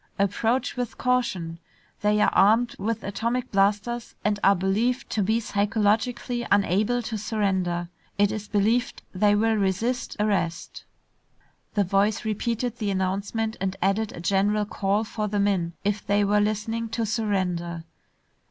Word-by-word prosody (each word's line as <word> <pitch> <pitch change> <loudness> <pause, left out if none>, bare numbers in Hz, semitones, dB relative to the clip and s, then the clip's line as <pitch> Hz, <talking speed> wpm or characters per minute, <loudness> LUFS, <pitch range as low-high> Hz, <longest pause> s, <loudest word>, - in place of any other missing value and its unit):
Approach 220 +6 0
with 245 -2 -3
caution, 235 -10 -1 0.4
they 210 0 +2
are - - +4
armed 225 +5 +4
with 220 +3 -2
atomic 235 +5 -2
blasters 210 +4 0
and 205 -1 +1
are 200 - +6
believed 215 +8 0
to 215 - 0
be 220 +4 +2
psychologically 220 +3 0
unable 205 +5 +2
to 225 -1 -4
surrender. 190 -5 -1 0.3
It 205 0 +3
is 210 -1 -5
believed 225 +6 +1
they 205 +2 +3
will 225 +2 +2
resist 215 +5 -1
arrest...." 195 -5 -1 0.9
The 205 - +3
voice 200 +4 +1
repeated 230 +2 -2
the 210 -3 -1
announcement 200 +4 -1
and 190 0 -1
added 195 +3 +1
a - - -9
general 200 +4 +1
call 205 +1 0
for 215 -1 -3
the 205 0 -1
men, 190 -4 +1
if 205 0 -1
they 205 0 +2
were 205 +1 +3
listening, 220 +2 -1
to 230 - +1
surrender. 185 -6 -1
210 Hz, 145 wpm, -25 LUFS, 195-225 Hz, 0.9 s, are